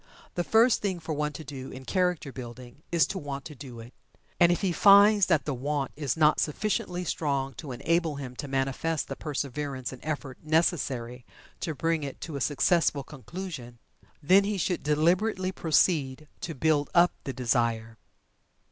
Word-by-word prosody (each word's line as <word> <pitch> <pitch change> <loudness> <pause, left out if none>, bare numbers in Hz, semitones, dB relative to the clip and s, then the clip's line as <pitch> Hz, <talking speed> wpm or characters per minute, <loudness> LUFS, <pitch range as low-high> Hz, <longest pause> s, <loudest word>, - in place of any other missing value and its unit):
The 175 - -1
first 225 +5 +4
thing 190 -4 -1
for 160 -1 -4
one 150 0 -1
to 160 - -7
do 135 -2 -8
in 130 0 -10
character 180 -5 0
building 125 +1 -10
is 170 -1 +4
to 195 - -4
"want 140 -3 -6
to 155 - -8
do 130 -4 -10
it." 115 +2 -11 0.5
And 175 -1 +6
if 175 - 0
he 195 -3 +1
finds 200 +2 +6
that 155 -8 +2
the 145 - -1
"want" 140 +2 -2
is 145 -1 -2
not 155 -1 +4
sufficiently 180 +1 -1
strong 140 -5 -1
to 145 - -7
enable 165 +4 0
him 130 -3 -7
to 145 - -5
manifest 135 +4 -1
the - - -4
perseverance 140 -3 -4
and 130 - -12
effort 145 -4 -4
necessary 135 -7 0 0.4
to 160 -4 -3
bring 165 +1 0
it 140 -2 -6
to 160 - -6
a 140 - -4
successful 150 +1 +2
conclusion, 140 -3 -8 0.5
then 190 +6 +6
he 205 0 -1
should 180 -1 -1
deliberately 180 +6 +1
proceed 155 -4 +1
to 165 - -5
"build 145 +1 +1
up 175 0 +6
the 135 - -3
desire." 115 -3 -1
150 Hz, 175 wpm, -28 LUFS, 135-175 Hz, 0.5 s, And